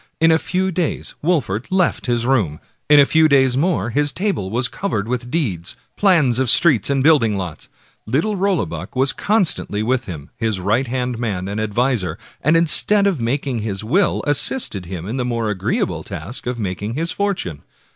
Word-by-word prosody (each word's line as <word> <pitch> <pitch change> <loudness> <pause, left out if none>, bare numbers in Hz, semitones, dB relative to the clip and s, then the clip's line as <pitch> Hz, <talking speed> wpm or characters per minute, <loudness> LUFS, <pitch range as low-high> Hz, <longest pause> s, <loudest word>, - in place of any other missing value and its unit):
In 165 0 +4
a 160 - +3
few 190 +2 -1
days 175 -3 -2
Wolfert 135 - -1
left 185 -6 +1
his 120 -1 0
room; 105 - 0 0.3
in 150 0 +7
a 140 - +7
few 160 +2 +3
days 130 -3 +4
more 140 - 0
his 145 +3 +1
table 185 - -2
was 120 +4 0
covered 110 - -3
with 120 0 -3
deeds, 100 - -3 0.2
plans 160 - +3
of 130 -2 +1
streets 145 - +4
and 135 -1 +1
building 130 -10 +3
lots. 90 -5 -6 0.4
Little 155 - 0
Rollebuck 195 -6 -2
was 135 +1 +2
constantly 185 - 0
with 125 +2 0
him, 75 -6 -8
his 110 -4 -1
right 110 +8 0
hand 125 -1 -3
man 100 -6 -3
and 100 +2 -3
adviser, 110 -5 -1 0.2
and 155 +4 +3
instead 200 +5 +4
of 185 -10 0
making 130 +1 -2
his 105 -2 -4
will 175 - +1
assisted 145 - +1
in 95 +6 -5
the 125 - -1
more 115 -3 -2
agreeable 95 -3 -2
task 120 - -7
of 125 0 -2
making 105 +2 -4
his 165 +3 -1
fortune. 185 - -3
125 Hz, 175 wpm, -19 LUFS, 105-160 Hz, 0.4 s, in